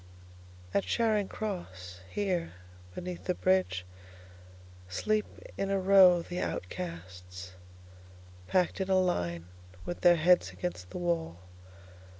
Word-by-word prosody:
At 100 - +2
Charing 210 - +1
Cross, 95 - -6
here, 185 - -1 0.4
beneath 180 -1 -6
the 180 - 0
bridgeSleep 185 - +1 1.8
in 195 - 0
a 195 0 +1
row 185 -2 +6
the 180 +1 -5
outcasts, 90 +1 -6 1.0
Packed 185 +1 +1
in 190 - -2
a 190 -1 +4
line 85 - -1 0.4
with 175 - -5
their 175 -1 +7
heads 175 - +4
against 90 0 -5
the - - -6
wall. 170 - -1
175 Hz, 110 wpm, -30 LUFS, -, 1.8 s, their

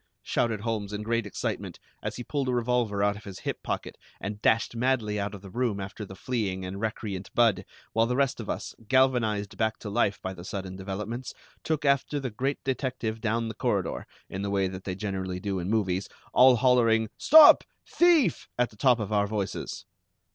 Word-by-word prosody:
shouted 115 -3 0
Holmes 105 -2 -3
in 105 +1 -3
great 115 -1 0
excitement, - - -4 0.2
as - - -4
he 120 - -5
pulled 140 0 -2
a - - +1
revolver 120 -4 +1
out 100 0 +2
of 105 - -11
his 100 -2 -9
hip - - -4
pocket - - -4 0.2
and 105 +1 -5
dashed 115 +1 +2
madly 115 -4 0
out 100 0 -3
of 100 - -12
the 100 - -9
room 120 -3 -1
after 100 +2 -6
the 95 - -10
fleeing 100 -6 -2
and 95 +2 -5
recreant 105 -4 -4
Budd, 110 -6 +4 0.3
while 115 0 +3
the 125 - 0
rest 135 -1 +1
of 110 - -6
us, - - -4
galvanized 115 -6 +2
back 110 +1 0
to 105 - -7
life 100 0 +1
by 95 - -5
the 85 - -10
sudden 95 0 -5
developments, 105 +6 -5 0.3
took 155 -2 -1
after 140 +1 +2
the 130 -3 -4
great 135 +6 -1
detective 130 -4 -2
down 115 +1 0
the 110 - -4
corridor, - - -1 0.2
in 95 - -5
the 100 - -2
way 100 -1 +1
that 95 0 -8
they 95 - -3
generally 95 -2 -3
do 95 0 -2
in 90 - -4
the - - 0
movies, 95 -3 -1 0.2
all 130 0 +7
hollering: 115 -2 +3
"Stop 315 -1 +9 0.2
thief!" 335 - +3
at 125 0 +1
the 105 - -18
top 125 0 +4
of 105 0 -3
our 100 -1 +2
voices. 100 -2 -4
110 Hz, 205 wpm, -27 LUFS, 100-125 Hz, 0.3 s, Stop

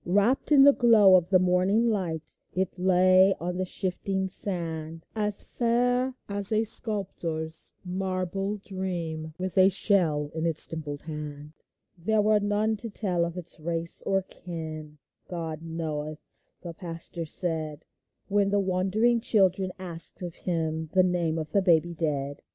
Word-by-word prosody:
Wrapped 205 - +1
in 280 -2 +8
the 285 0 +8
glow 220 -7 +6
of 180 -2 +2
the 190 - +6
morning 185 +5 +2
light, 175 -8 -3 0.2
It 185 0 -2
lay 185 +1 +5
on 180 +2 -3
the 185 - -1
shifting 190 +1 -2
sand, 165 -4 +1
As 210 -2 0
fair 245 +2 0
as 200 +1 +1
a 220 0 +2
sculptor's 170 -8 -4
marble 190 +2 -2
dream, 170 -6 -5
With 185 +1 -1
a 185 +1 +7
shell 170 -7 +1
in 160 +1 -1
its 160 -2 +2
dimpled 150 -3 -6
hand. 150 -1 -7 0.4
There 210 +5 +1
were 215 0 +4
none 205 +2 0
to 230 +2 -7
tell 185 -5 -1
of 170 +1 -6
its 175 -2 -2
race 165 +1 +1
or 195 -1 0
kin. 155 -4 -8 0.2
" - - -48
God 160 -3 -5
knoweth," 155 -2 -4 0.5
the 170 -2 -6
pastor 170 -1 -6
said, 160 -3 -1 0.4
When 200 -1 +2
the 205 0 +2
wondering 195 +5 +1
children 190 -4 +2
asked 175 -1 -1
of 175 -2 -5
him 160 -3 -3
The 185 - +5
name 175 -3 0
of 155 -1 -5
the 200 - +3
baby 175 -2 +3
dead. 145 -4 -3
180 Hz, 150 wpm, -27 LUFS, 160-200 Hz, 0.5 s, in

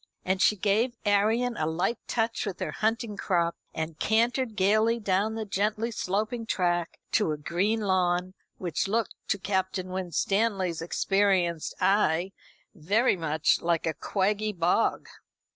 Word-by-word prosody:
And 190 0 0
she 210 - +5
gave 215 +5 +1
Arion 220 +4 +2
a 155 - 0
light 175 +8 -1
touch 225 -2 -1
with 190 - -5
her 155 - -3
hunting 220 +2 -1
crop, 170 -3 0 0.2
and 160 0 -5
cantered 235 +1 +1
gaily 215 +4 +3
down 205 +1 0
the 220 -1 -3
gently 215 +3 -1
sloping 220 +3 -2
track 175 -3 0
to - - +2
a 150 - -2
green 190 +9 0
lawn, 185 -2 +1 0.2
which 175 0 -2
looked, 220 +2 0
to - - +1
Captain 190 -1 -2
Winstanley's 190 0 0
experienced 180 -2 +1
eye, 190 -2 +2 0.4
very 205 +8 +2
much 160 -3 +1
like 170 -1 0
a 160 - 0
quaggy 210 +4 -1
bog. 175 +6 +1
195 Hz, 140 wpm, -27 LUFS, 175-220 Hz, 0.4 s, she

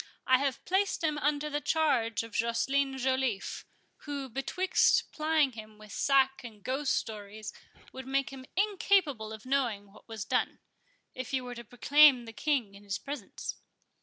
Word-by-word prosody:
I 255 0 +5
have 275 -2 -2
placed 380 -1 +1
him 305 -2 +1
under 295 0 0
the 295 0 -2
charge 260 -10 +1
of 230 - -10
Joceline 270 +4 +1
Joliffe, 260 -5 -1 0.3
who, 280 -2 -5
betwixt 365 +10 +2
plying 310 -3 +2
him 215 -2 -11
with 215 -1 -13
sack 270 +2 +2
and 215 -4 -11
ghost 275 +2 0
stories, 210 0 -6 0.4
would 260 0 -8
make 275 +1 0
him 260 -1 -10
incapable 375 - +2
of 220 +1 -9
knowing 235 -7 -1
what 215 - -18
was 220 -3 -5
done, - - 0 0.6
if 255 +1 -6
you 260 -1 0
were 245 0 -6
to 235 0 -8
proclaim 260 +2 +5
the 225 - -9
King 255 -6 0
in 200 +1 -14
his 200 -2 -3
presence." 280 -7 -6
265 Hz, 165 wpm, -30 LUFS, 225-290 Hz, 0.6 s, I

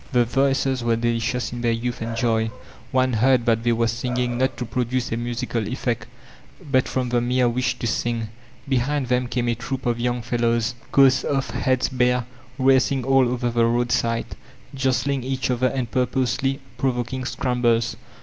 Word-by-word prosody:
The 120 -1 +4
voices 135 0 +1
were 115 -1 +2
delicious 120 +2 -1
in 120 - -5
their 120 -1 +2
youth 115 +1 -3
and 115 0 -3
joy; 115 -2 +1 0.4
one 130 -1 +2
heard 120 +2 +3
that 115 -2 +2
they 120 0 +1
were 115 0 +2
singing 120 +1 -1
not 130 +1 0
to 125 - -3
produce 125 +1 -2
a - - 0
musical 120 -2 -2
effect, 120 -2 -2 0.6
but 130 -2 +3
from 130 -2 -1
the 120 0 +1
mere 125 +1 +2
wish 125 +2 0
to - - -4
sing. 115 -1 -1 0.4
Behind 135 0 0
them 125 0 +1
came 120 0 -1
a 120 - +2
troop 125 +3 -5
of 120 -1 +1
yotmg 120 0 -1
fellows, 120 0 0 0.2
coats 135 -1 +5
off, 135 -1 -1
heads 130 -1 +1
bare, 125 -1 +1 0.3
racing 130 0 +3
all 135 -1 +4
over 120 -1 -1
the 115 0 +2
roadside, 115 -1 0 0.4
jostling 135 0 0
each 130 0 -1
other 125 +1 +2
and 125 -3 -3
purposely 130 +2 0 0.2
provoking 130 0 -1
scrambles. 120 -3 0
125 Hz, 170 wpm, -23 LUFS, 120-130 Hz, 0.6 s, coats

